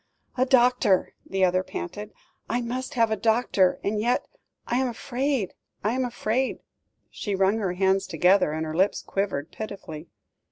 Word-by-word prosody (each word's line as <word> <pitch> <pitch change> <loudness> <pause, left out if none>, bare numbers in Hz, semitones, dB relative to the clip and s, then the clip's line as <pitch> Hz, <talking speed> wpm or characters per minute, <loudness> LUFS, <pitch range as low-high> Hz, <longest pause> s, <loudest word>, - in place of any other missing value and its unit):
"A 255 +1 +2
doctor," 250 -6 +3
the 190 -1 +2
other 185 0 +2
panted. 205 +3 -6 0.4
"I 240 - +1
must 255 +4 -4
have 230 -2 +3
a - - +3
doctor; 220 -3 +2
and 210 +1 0
yet 240 +3 +1 0.4
I 240 - 0
am 260 0 +2
afraid 250 -2 -2 0.3
I 215 +3 +1
am 260 0 0
afraid," 245 +1 -1 0.5
she 205 -2 -3
wrung 195 +3 +2
her 190 -4 -1
hands 190 +1 +2
together, 180 +1 +3
and 160 +1 -2
her 155 0 -4
lips 190 +4 +2
quivered 190 -7 -2
pitifully. 175 -7 -7
210 Hz, 160 wpm, -26 LUFS, 190-245 Hz, 0.5 s, doctor